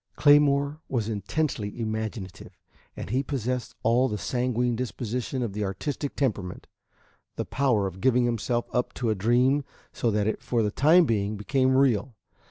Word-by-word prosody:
III - - -49
Claymore 145 0 +4
was 115 -5 -1
intensely 110 +1 -2
imaginative, 110 -4 -5 0.4
and 95 - -6
he 130 +3 +2
possessed 125 -3 -3
all 120 +3 +3
the 105 - -2
sanguine 125 +1 0
disposition 125 +1 -3
of 110 -5 -3
the 105 +1 -2
artistic 135 +9 -3
temperament, 105 -9 -2 0.7
the - - -3
power 125 -7 +1
of 95 0 -6
giving 125 -1 +3
himself 120 0 -1
up 125 0 -1
to 120 -3 0
a - - +3
dream 125 +7 +2 0.3
so 120 - 0
that 105 -1 +1
it 110 - -1
for 120 -2 0
the 105 - 0
time 160 - +5
being 105 -4 -1
became 130 +5 +1
real. 125 -3 +2
120 Hz, 165 wpm, -26 LUFS, 105-130 Hz, 0.7 s, time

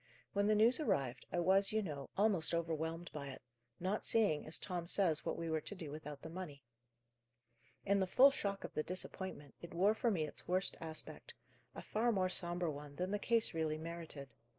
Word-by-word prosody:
"When 200 0 +2
the 215 - +4
news 230 +6 +5
arrived, 135 - 0
I 175 - 0
was, 195 +3 +4
you 215 0 +1
know, 145 -6 -5
almost 195 -5 +3
overwhelmed 165 +1 -2
by 140 -2 -5
it; 135 - -9 0.4
not 190 +4 -1
seeing, 205 -11 +3
as 155 - +1
Tom 175 -3 -3
says, 170 -5 +3
what - - -2
we 165 - -3
were 160 -1 0
to 205 - -6
do 165 -6 -7
without 150 -1 -7
the 160 - -6
money. 165 -6 -7 1.2
In 200 +1 +3
the 190 - +1
full 265 +8 +7
shock 200 -6 -2
of - - -6
the 155 - 0
disappointment, 185 -3 -4
it 170 0 -9
wore 195 +5 +4
for 230 +2 +1
me 180 -8 +1
its 150 - -6
worst 185 +2 +1
aspect; 160 -1 -5 0.4
a - - -7
far 235 +3 +1
more 185 -4 +1
sombre 175 -2 -1
one 145 0 -8
than 180 +4 -2
the 205 - 0
case 230 +1 +2
really 160 -1 0
merited. 160 -4 -7
175 Hz, 200 wpm, -37 LUFS, 155-200 Hz, 1.2 s, full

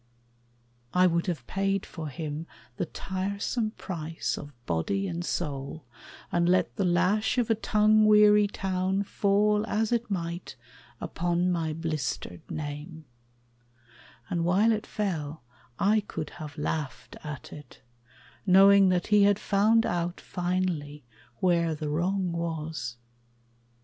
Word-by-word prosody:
I 180 0 +6
would 170 0 +1
have 155 -9 -3
paid 195 +3 -1
For 160 -3 -7
him 155 +2 -5 0.3
the - - -2
tiresome 200 +6 -2
price 165 -3 -3
of 145 - -8
body 90 - -1
and 170 -1 -3
soul, 145 -3 -4 0.5
And 175 0 +2
let 185 0 +2
the 195 - 0
lash 185 +7 +2
of 235 -2 +2
a - - +7
tongue 215 0 +3
weary 210 -1 +6
town 190 0 -1
Fall 210 +1 +2
as 220 +1 0
it 235 -1 0
might 170 -4 -4 0.4
upon 175 +1 0
my 165 -3 -1
blistered 155 - -3
name; 155 +2 -6 1.2
And 170 -2 -1
while 195 +6 +4
it 215 -1 -1
fell 160 - -3 0.3
I 210 +2 +3
could 165 -7 -6
have 150 0 -8
laughed 150 -1 -4
at 150 -3 -7
it, 150 -1 -13 0.6
Knowing 195 0 +7
that 180 -1 +1
he 210 - +7
had 200 -1 +4
found 215 +3 +3
out 175 0 -2
finally 175 -6 -2 0.4
Where 170 -3 +2
the 150 0 -4
wrong 180 +4 0
was. 160 -7 -4
175 Hz, 130 wpm, -28 LUFS, 160-200 Hz, 1.2 s, a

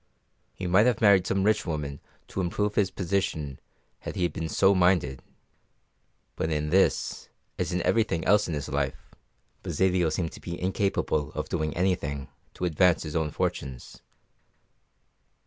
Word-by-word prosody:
He 95 - -6
might 95 +6 +4
have 120 -3 +2
married 100 -4 +5
some 95 0 +1
rich 105 +1 +3
woman 75 -4 -4 0.3
to 95 - -2
improve 105 +4 -1
his 100 -3 +2
position 85 -7 -2 0.4
had - - -7
he 90 -2 +1
been 80 -1 -4
so 95 +4 +4
minded, 90 -8 +2 1.1
but 80 - -1
in 75 -1 -1
this, 95 +2 +1 0.3
as - - -1
in 90 -1 -1
everything 110 -8 +1
else 105 0 +4
in 80 - -2
his 75 - -4
life, 70 -2 -3 0.5
Basilio 90 -2 +1
appeared 80 +1 -1
to - - -12
be 85 0 -6
incapable 95 -6 0
of - - -4
doing 75 0 -2
anything 75 -7 -1 0.3
to 90 - -2
advance 90 +1 +3
his 75 -2 -6
own 80 -2 +1
fortunes. 65 -3 -4
90 Hz, 150 wpm, -27 LUFS, 75-95 Hz, 1.1 s, married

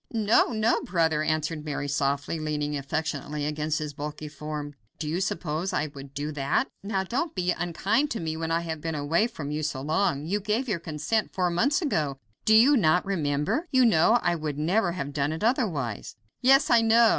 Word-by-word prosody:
"No! 220 -1 +4
no! 225 -1 +1
brother," 160 -4 +1
answered 155 0 -1
Mary 145 -1 -3
softly, 140 +2 -1
leaning 150 -1 -2
affectionately 150 0 -3
against 150 +1 -1
his 150 -1 -4
bulky 150 +1 -6
form; 150 0 -6 0.2
"do 150 - -4
you 170 +5 -1
suppose 165 0 -2
I 150 0 -1
would 140 -1 -11
do 145 +2 -3
that? 145 - 0
Now 195 -1 -1
don't 270 - -2
be 180 -1 +1
unkind 195 - 0
to 230 - -3
me 160 -1 -3
when 160 0 -3
I 165 +1 +1
have 160 -2 -5
been 160 0 -3
away 160 +9 +1
from 150 -11 -6
you 150 +1 -2
so 150 -3 -2
long! 150 0 0
You 200 +6 0
gave 215 +6 -1
your 200 -7 -1
consent 160 +7 -2
four 180 -2 +1
months 275 - +2
ago. 150 - 0 0.3
Do 220 - +5
you 255 +7 +7
not 180 - +3
remember? 155 - -1
You 260 -1 +4
know 220 +1 +5
I 175 - +2
would 155 -3 -3
never 175 +4 +1
have 145 -5 -4
done 145 0 0
it 160 +5 -4
otherwise." 175 - -1 0.3
"Yes, 270 +2 +5
I 235 -1 +6
know! 225 0 +5
160 Hz, 200 wpm, -26 LUFS, 150-210 Hz, 0.3 s, you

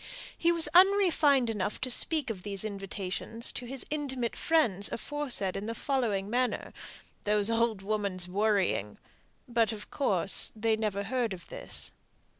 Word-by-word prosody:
He 340 - +2
was 335 -2 +3
even 380 +2 +8
unrefined 300 -10 +3
enough 210 -2 -2
to 260 -1 +2
speak 300 0 +3
of 190 -4 -7
these 200 0 -2
invitations 200 +2 -4
to 245 - -7
his 265 +1 -4
intimate 265 -6 -2
friends 225 - +1
aforesaid 260 -9 -2
as 230 +1 -1 0.5
"those 210 +1 +2
old 230 -3 +1
women's 200 -3 0
worrying," 195 - 0 0.5
but, 230 -2 +2
of 210 -2 -8
course, 195 - +1
they 220 0 +1
never 210 -2 -2
heard 235 0 -1
of 175 -2 -11
this. - - -2
220 Hz, 135 wpm, -30 LUFS, 200-260 Hz, 0.5 s, even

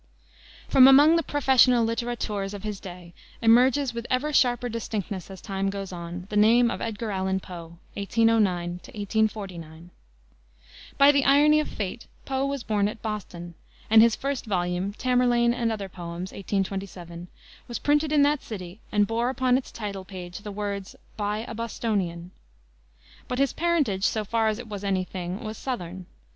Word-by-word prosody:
From 260 -1 +7
among 290 +4 +7
the 335 - +3
professional 260 -5 +4
littérateurs 225 -4 -3
of 200 - -9
his 210 -2 -4
day 175 -3 -10 0.3
emerges, 250 +3 +4
with 235 0 -5
ever 280 +4 0
sharper 245 -2 +3
distinctness 210 -5 -4
as 190 -1 -10
time 195 -1 -2
goes 195 -1 -5
on, 175 +1 -7
the - - -3
name 230 +3 +5
of - - -5
Edgar 225 -1 -3
Allan 190 0 -1
Poe 170 -2 -10 0.2
(1809 200 -4 +2 0.2
1849.) 190 -6 -3 1.1
By 280 +1 +7
the 280 -1 +2
irony 295 +3 +5
of 305 - -1
fate 205 +3 -5 0.2
Poe 270 0 -1
was 280 -3 -3
born 205 -2 +1
at 215 +2 -7
Boston, 180 -6 -5 0.4
and 220 0 +8
his 230 -1 +5
first 275 -3 -3
volume, 180 0 -1
Tamerlane 245 0 +2
and 235 -2 -1
Other 205 -3 -4
Poems, 175 0 -7
1827, 190 -3 -4 0.4
was 240 - -4
printed 295 +1 +1
in 295 -2 +5
that 290 0 +2
city 185 -2 -8
and 210 -1 +3
bore 230 +3 0
upon 255 -1 +2
its 260 - -2
title 200 -4 -5
page 180 -1 -8
the 205 0 -8
words, 200 -1 -5 0.2
"By 210 +1 -2
a - - -6
Bostonian." 200 -6 -3 1.0
But 250 - -3
his 275 -1 +1
parentage, 295 - +1
so 215 -1 0
far 225 +1 +1
as 215 -1 0
it 245 -1 -8
was 205 -2 -6
any 190 -2 0
thing, 185 +4 -6
was 215 -1 -6
southern. 185 -8 -5
215 Hz, 165 wpm, -26 LUFS, 190-245 Hz, 1.1 s, and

